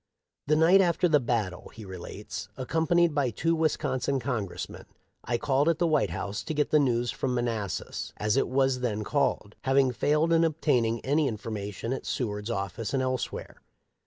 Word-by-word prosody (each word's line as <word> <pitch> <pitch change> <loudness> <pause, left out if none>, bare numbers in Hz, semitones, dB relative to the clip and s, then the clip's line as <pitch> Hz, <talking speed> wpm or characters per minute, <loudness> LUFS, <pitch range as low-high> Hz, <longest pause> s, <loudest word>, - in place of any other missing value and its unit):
" - - -59
The 155 - +4
night 170 +5 +6
after 180 -1 +2
the 155 -3 +4
battle,'" 110 -8 -2
he 110 - -11
relates, 95 -2 -7
"accompanied 165 +4 +2
by 140 -3 +1
two 165 +9 0
Wisconsin 140 -4 0
Con= 120 -5 -2
gressmen, - - -7 0.4
I 120 - 0
called 145 +3 +2
at 165 - +2
the 175 - +1
White 155 - +2
House 100 +4 -4
to 155 - -3
get 150 0 +1
the 150 - +5
news 120 -3 +1
from 130 -2 -2
Manassas, 115 -7 -3
as 105 +1 +1
it 135 - +2
was 130 0 +2
then 110 -4 -1
called, 130 -4 0
having 135 -1 +3
failed 150 +6 +2
in 165 0 +4
obtaining 130 -8 +1
any 145 +2 +2
information 110 0 -4
at 135 - -5
Seward's 105 -3 -2
office 105 +3 -3
and 130 - +1
elsewhere. 130 -1 -3
130 Hz, 180 wpm, -28 LUFS, 110-150 Hz, 0.4 s, night